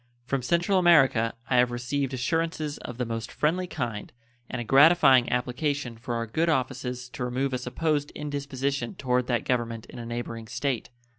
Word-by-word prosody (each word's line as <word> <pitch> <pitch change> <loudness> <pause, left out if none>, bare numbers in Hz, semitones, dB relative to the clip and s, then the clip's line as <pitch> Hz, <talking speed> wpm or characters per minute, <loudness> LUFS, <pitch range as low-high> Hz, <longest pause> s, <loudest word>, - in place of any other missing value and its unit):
From 135 +1 -1
Central 175 +8 +2
America 135 -10 +4
I 125 - +2
have 125 0 +5
received 125 +3 -2
assurances 155 +3 -1
of 125 - -8
the 125 - -1
most 115 0 -4
friendly 180 +4 0
kind 120 -10 -4 0.4
and 125 - -4
a - - -2
gratifying 135 -1 +6
application 125 +1 -1
for 120 +1 -5
our 115 0 -1
good 160 +10 0
offices 125 -3 -2
to 130 -1 -5
remove 130 +2 -1
a 130 - 0
supposed 145 +4 -1
indisposition 140 -3 -3
toward 125 -2 0
that 120 -2 0
Government 115 -3 -1
in - - -11
a 120 - -6
neighboring 115 -1 -5
State. 130 +1 -2
130 Hz, 170 wpm, -27 LUFS, 120-145 Hz, 0.4 s, gratifying